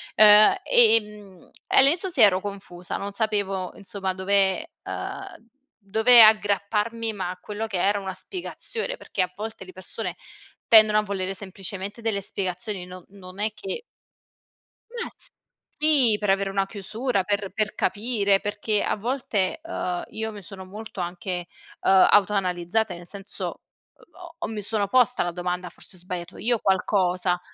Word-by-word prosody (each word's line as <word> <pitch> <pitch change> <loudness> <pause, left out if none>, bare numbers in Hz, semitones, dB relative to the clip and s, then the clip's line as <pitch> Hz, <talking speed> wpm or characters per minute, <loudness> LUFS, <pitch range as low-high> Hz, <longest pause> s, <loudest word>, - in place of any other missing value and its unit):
Uhm, 210 - +8
e, 485 - +5
ehm 210 -4 -5 0.2
e - - +1
all'inizio 335 +8 +4
sì 275 -9 0
ero 190 -3 +6
confusa, 195 -3 -7
non 200 +1 -5
sapevo 200 -4 -1
insomma 195 -1 -4
dove 190 0 +1
uhm, 380 - -7 0.4
dove 220 +3 +7
aggrapparmi 215 +1 +2
ma 185 -3 -4
a 180 - -6
quello 215 +3 -5
che 195 -4 -3
era 205 +2 +2
una 190 -1 -5
spiegazione, 445 - -5
perché 190 - -3
a 180 - -1
volte 215 -2 -7
le 185 - -11
persone 185 0 -6 0.5
tendono 215 -1 +7
a 215 - +3
volere 195 -1 -3
semplicemente 195 +2 -7
delle 215 -3 -1
spiegazioni, 185 0 -4
no 180 -1 -11
non 190 -1 -13
è 215 +1 -1
che 395 - -5 1.1
Ma 470 -1 -5 0.7
sì, 285 -8 +4
per 205 -2 -1
avere 195 0 +2
una 195 0 0
chiusura, 215 +2 -2
per 200 0 -1
per 215 -1 -1
capire 205 -3 +1
perché 205 +1 -1
a - - 0
volte, 225 - -1
uhm, 180 - -3
io 220 0 -4
mi 205 -1 -10
sono 190 +1 -10
molto 210 +1 -9
anche, 175 0 -4 0.3
uhm, 190 -1 +6
autoanalizzata, 195 0 +2
nel 175 0 -11
senso 200 +1 -7
ho - - -5 0.5
ho 340 0 -13
ho - - -3
mi 215 -1 -5
sono 205 0 -1
posta 250 +2 +3
la 175 - -2
domanda: 180 +1 -3
"Forse - - -10
ho - - -5
sbagliato 180 0 -7
io 235 0 0
qualcosa." 185 -2 +1
200 Hz, 155 wpm, -25 LUFS, 185-220 Hz, 1.1 s, Uhm